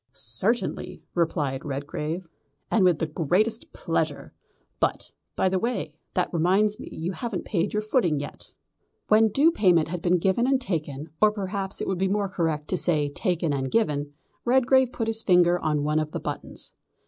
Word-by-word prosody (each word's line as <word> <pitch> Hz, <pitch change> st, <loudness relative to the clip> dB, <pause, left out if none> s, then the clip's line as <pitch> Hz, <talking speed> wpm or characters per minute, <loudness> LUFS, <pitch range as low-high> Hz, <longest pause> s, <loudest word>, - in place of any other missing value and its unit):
"Certainly," 195 Hz, -, -2 dB
replied 150 Hz, -5 st, 0 dB
Redgrave, 150 Hz, +5 st, -4 dB, 0.4 s
"and 220 Hz, -, +4 dB
with 180 Hz, -3 st, +4 dB
the 160 Hz, -, -1 dB
greatest 205 Hz, -, 0 dB
pleasure -, -, -2 dB, 0.5 s
but, -, -, -1 dB, 0.2 s
by -, -, +2 dB
the 185 Hz, 0 st, +1 dB
way, 220 Hz, -8 st, -2 dB, 0.2 s
that 180 Hz, 0 st, 0 dB
reminds 195 Hz, +6 st, +2 dB
me -, -, -8 dB
you 165 Hz, +3 st, -3 dB
haven't 215 Hz, -1 st, -4 dB
paid 190 Hz, 0 st, 0 dB
your 210 Hz, 0 st, -1 dB
footing 210 Hz, -, +1 dB
yet." 145 Hz, -, -8 dB, 0.6 s
When 220 Hz, +1 st, +6 dB
due 290 Hz, +10 st, +4 dB
payment 180 Hz, -, +3 dB
had 175 Hz, 0 st, -4 dB
been 180 Hz, +1 st, +3 dB
given 190 Hz, +8 st, +1 dB
and 270 Hz, -1 st, +3 dB
taken, 155 Hz, -, -4 dB
or 215 Hz, 0 st, +6 dB
perhaps 195 Hz, -1 st, -3 dB
it -, -, -2 dB
would 190 Hz, -2 st, -1 dB
be 190 Hz, -, +2 dB
more 200 Hz, 0 st, 0 dB
correct 160 Hz, -5 st, -1 dB
to 185 Hz, -, +1 dB
say 150 Hz, -5 st, +2 dB
taken 170 Hz, 0 st, -1 dB
and 135 Hz, -1 st, -2 dB
given, 145 Hz, -, 0 dB, 0.3 s
Redgrave 260 Hz, +1 st, +4 dB
put 230 Hz, -, -2 dB
his 225 Hz, 0 st, -1 dB
finger 180 Hz, -3 st, +4 dB
on 150 Hz, -3 st, 0 dB
one 150 Hz, +1 st, +1 dB
of 155 Hz, -1 st, -3 dB
the -, -, -2 dB
buttons. -, -, -7 dB
180 Hz, 175 wpm, -26 LUFS, 155-215 Hz, 0.6 s, When